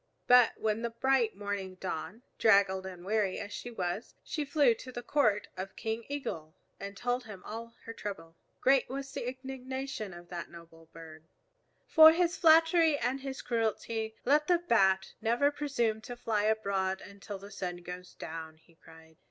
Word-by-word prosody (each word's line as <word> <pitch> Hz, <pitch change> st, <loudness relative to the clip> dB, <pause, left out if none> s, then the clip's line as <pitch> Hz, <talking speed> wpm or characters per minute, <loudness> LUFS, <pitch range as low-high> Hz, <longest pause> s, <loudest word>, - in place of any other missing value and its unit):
But 250 Hz, -2 st, +6 dB
when 220 Hz, 0 st, -1 dB
the 235 Hz, -, -1 dB
bright 235 Hz, -1 st, +1 dB
morning 200 Hz, -2 st, -4 dB
dawned, 190 Hz, +5 st, -5 dB, 0.2 s
draggled 195 Hz, -3 st, +4 dB
and 180 Hz, -1 st, -9 dB
weary 205 Hz, -2 st, +1 dB
as 205 Hz, -, -6 dB
she 245 Hz, -, -6 dB
was, 190 Hz, -1 st, -4 dB
she 305 Hz, -, -3 dB
flew 285 Hz, -4 st, +4 dB
to 255 Hz, +3 st, -10 dB
the 240 Hz, -1 st, -6 dB
court 215 Hz, -9 st, +2 dB
of 190 Hz, +1 st, -6 dB
King 225 Hz, +1 st, -3 dB
Eagle 165 Hz, -, -5 dB, 0.2 s
and 200 Hz, 0 st, -7 dB
told 245 Hz, +3 st, -1 dB
him 200 Hz, -4 st, -10 dB
all 230 Hz, +2 st, -7 dB
her 230 Hz, -, -6 dB
trouble. 195 Hz, -7 st, -7 dB, 0.3 s
Great 270 Hz, 0 st, +4 dB
was 275 Hz, +1 st, -5 dB
the 240 Hz, -, -4 dB
indignation 260 Hz, -3 st, -5 dB
of 175 Hz, 0 st, -12 dB
that 175 Hz, -2 st, -6 dB
noble 165 Hz, -1 st, -14 dB
bird. 160 Hz, -1 st, -12 dB, 0.6 s
"For 315 Hz, 0 st, +9 dB
his 345 Hz, 0 st, +1 dB
flattery 325 Hz, -1 st, +5 dB
and 260 Hz, 0 st, -1 dB
his 270 Hz, -1 st, -6 dB
cruelty 225 Hz, -1 st, -1 dB
let 300 Hz, +3 st, +3 dB
the 355 Hz, -, +5 dB
Bat 195 Hz, -, +2 dB
never 240 Hz, +6 st, +2 dB
presume 250 Hz, -7 st, -1 dB
to 245 Hz, -, -7 dB
fly 215 Hz, -3 st, 0 dB
abroad 195 Hz, -3 st, 0 dB
until 200 Hz, 0 st, -8 dB
the 200 Hz, +1 st, -12 dB
sun 180 Hz, -3 st, -4 dB
goes 180 Hz, +1 st, -8 dB
down," 160 Hz, -1 st, -7 dB
he 165 Hz, +1 st, -25 dB
cried. 160 Hz, -1 st, -18 dB
220 Hz, 170 wpm, -31 LUFS, 190-260 Hz, 0.6 s, For